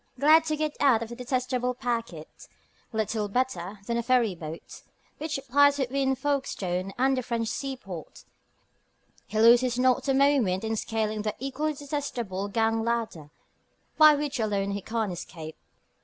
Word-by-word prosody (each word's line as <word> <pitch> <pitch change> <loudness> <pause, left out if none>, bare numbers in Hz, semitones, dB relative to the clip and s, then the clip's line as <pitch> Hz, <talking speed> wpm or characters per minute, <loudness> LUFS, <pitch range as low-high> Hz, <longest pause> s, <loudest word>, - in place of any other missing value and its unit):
Glad 310 +3 +6
to 310 -1 0
get 305 -1 -2
out 245 -5 +4
of 225 - -8
the 235 - -7
detestable 250 0 -1
packet, 230 -11 -5 0.4
little 220 -1 -1
better 205 -5 -2
than 235 +1 -1
a - - +1
ferry 240 -4 +2
boat, 165 -1 -9 0.4
which 300 -2 -3
plies 285 +2 +5
between 265 0 0
Folkestone 195 -10 -2
and 265 +2 +3
the 255 - -1
French 230 -2 -2
seaport, 255 - -6 1.0
he 215 - -2
loses 240 +2 +5
not 255 +1 +2
a 270 - +2
moment 265 -10 +3
in 225 0 -1
scaling 215 -1 -2
the 215 0 -3
equally 290 +3 -2
detestable 250 -9 -4
gang 225 +2 +1
ladder 225 -10 -2 0.7
by 305 -1 +9
which 290 -2 -3
alone 200 -2 0
he 200 0 -3
can 220 0 -2
escape. 160 -2 -8
235 Hz, 150 wpm, -27 LUFS, 210-270 Hz, 1.0 s, by